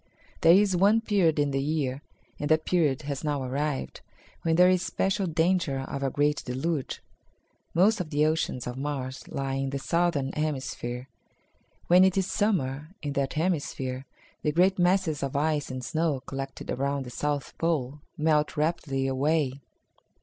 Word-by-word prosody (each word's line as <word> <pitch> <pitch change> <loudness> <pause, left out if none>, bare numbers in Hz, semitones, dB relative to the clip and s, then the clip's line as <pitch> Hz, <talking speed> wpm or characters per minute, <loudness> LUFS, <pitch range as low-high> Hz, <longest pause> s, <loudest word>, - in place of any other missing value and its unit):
"There 165 - +7
is 195 0 +4
one 205 +5 +4
period 195 -8 +2
in 145 -1 +2
the 135 0 0
year, 140 -2 -1 0.4
and 145 - -2
that 155 0 +3
period 155 -5 +1
has 140 0 -4
now 145 -3 -1
arrived, 140 +2 -3 0.4
when 165 -1 +1
there 180 +2 +7
is 185 -1 +3
special 190 +2 0
danger 160 -4 +1
of 140 +1 -5
a 135 - +1
great 145 +2 +1
deluge. 135 +3 -3 0.7
Most 195 +4 +4
of 165 - -5
the 150 0 +2
oceans 155 -5 -1
of 125 +1 -5
Mars 135 -2 -4
lie 135 -1 -3
in 135 0 -1
the 140 - -3
southern 155 -2 0
hemisphere. 130 -4 -3 0.8
When 180 +2 +6
it 190 0 +3
is 190 - +2
Summer 165 -6 -1
in 145 -1 -2
that 140 -1 -1
hemisphere, 140 -6 -2 0.3
the 150 - +1
great 185 +4 +3
masses 175 -4 +2
of 140 -1 -3
ice 150 0 0
and 130 -1 -5
snow 155 -3 0
collected 135 0 -6
around 140 +1 -1
the 125 - -8
south 145 +2 -2
pole 150 -4 -1 0.2
melt 155 -1 +1
rapidly 150 -4 0
away." 140 0 0
150 Hz, 165 wpm, -27 LUFS, 135-170 Hz, 0.8 s, There